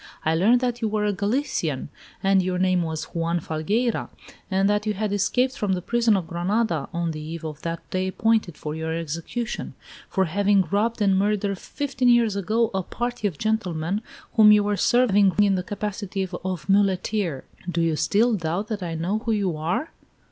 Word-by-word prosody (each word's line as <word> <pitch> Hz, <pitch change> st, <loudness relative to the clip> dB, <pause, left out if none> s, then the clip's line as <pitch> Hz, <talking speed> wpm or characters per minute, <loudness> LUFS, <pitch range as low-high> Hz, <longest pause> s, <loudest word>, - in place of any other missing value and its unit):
I 160 Hz, -, +3 dB
learned 220 Hz, +9 st, +4 dB
that 245 Hz, -1 st, -1 dB
you 225 Hz, -, +1 dB
were 210 Hz, 0 st, 0 dB
a 205 Hz, -, +1 dB
Galician, 215 Hz, +9 st, -1 dB, 0.3 s
that 195 Hz, 0 st, +4 dB
your 185 Hz, 0 st, -1 dB
name 185 Hz, -1 st, +2 dB
was 160 Hz, -2 st, -3 dB
Juan 170 Hz, +1 st, 0 dB
Falgueira, 205 Hz, +10 st, -1 dB, 0.4 s
and 195 Hz, 0 st, +2 dB
that 210 Hz, +1 st, +1 dB
you 210 Hz, -, 0 dB
had 205 Hz, 0 st, -1 dB
escaped 250 Hz, +6 st, +1 dB
from 205 Hz, -8 st, 0 dB
the 180 Hz, -, -2 dB
prison 235 Hz, -2 st, +2 dB
of 180 Hz, -, -3 dB
Granada, 175 Hz, -2 st, -1 dB
on 170 Hz, -1 st, -1 dB
the 155 Hz, -1 st, -6 dB
eve 160 Hz, +1 st, -6 dB
of 155 Hz, -1 st, -6 dB
the 165 Hz, 0 st, -3 dB
day 185 Hz, 0 st, 0 dB
appointed 220 Hz, -3 st, +1 dB
for 150 Hz, -, -5 dB
your 160 Hz, +1 st, -3 dB
execution, 170 Hz, +9 st, -4 dB, 0.3 s
for 190 Hz, -1 st, +1 dB
having 200 Hz, +1 st, +2 dB
robbed 220 Hz, +2 st, +1 dB
and 195 Hz, -1 st, +3 dB
murdered, 200 Hz, -1 st, 0 dB
fifteen 260 Hz, -3 st, -1 dB
years 235 Hz, -4 st, +4 dB
ago, 220 Hz, +4 st, +1 dB
a 190 Hz, -, 0 dB
party 240 Hz, +3 st, -3 dB
of 170 Hz, -7 st, -5 dB
gentlemen, 195 Hz, -3 st, -1 dB, 0.3 s
whom 215 Hz, -1 st, +7 dB
you 210 Hz, -1 st, +6 dB
were 205 Hz, 0 st, 0 dB
serving 205 Hz, -4 st, +4 dB
in 205 Hz, -1 st, +5 dB
the 185 Hz, -, 0 dB
capacity 200 Hz, 0 st, -3 dB, 0.2 s
of 185 Hz, -4 st, -4 dB
muleteer. 195 Hz, -5 st, +1 dB, 0.3 s
Do 170 Hz, -1 st, -1 dB
you 165 Hz, -1 st, +2 dB
still 225 Hz, +9 st, +2 dB
doubt 180 Hz, +2 st, -2 dB
that 215 Hz, -3 st, -3 dB
I 170 Hz, -2 st, -3 dB
know 180 Hz, +7 st, -1 dB
who 230 Hz, 0 st, -2 dB
you 195 Hz, -6 st, 0 dB
are?" 170 Hz, -, -2 dB
195 Hz, 190 wpm, -24 LUFS, 170-215 Hz, 0.4 s, whom